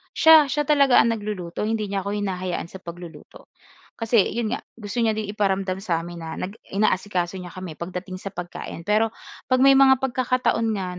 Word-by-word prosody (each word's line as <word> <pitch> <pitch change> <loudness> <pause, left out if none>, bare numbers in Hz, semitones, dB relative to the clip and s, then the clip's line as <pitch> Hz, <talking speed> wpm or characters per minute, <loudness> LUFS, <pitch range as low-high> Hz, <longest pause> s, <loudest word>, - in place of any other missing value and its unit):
siya, 320 -2 +7
siya 295 +2 0
talaga 280 -3 +4
ang 230 - +5
nagluluto 205 -4 -4
hindi 215 -2 -2
niya 200 - 0
ako 200 +2 -3
hinahayaan 185 -4 -3
sa 190 - -9
pagluluto. 175 -1 -11 0.4
Kasi 225 -4 +1
'yon 230 -2 -1
nga, - - -2
gusto 215 +1 -6
niya 225 -2 +2
din 215 -1 -4
iparamdam 195 -3 -1
sa 170 -5 -1
amin 175 0 -8
na 160 -1 -6
nag 190 - -4
inaasikaso 190 -2 0
niya 180 -2 -9
kami 185 -4 -8
pagdating 185 +2 -6
sa 195 0 -7
pagkain. 175 -1 -7
Pero 215 +4 +1 0.3
'pag 255 0 +2
may 275 0 +7
mga 265 -1 +7
pagkakataon 255 -2 0
nga 180 -2 -4
200 Hz, 185 wpm, -23 LUFS, 180-230 Hz, 0.4 s, siya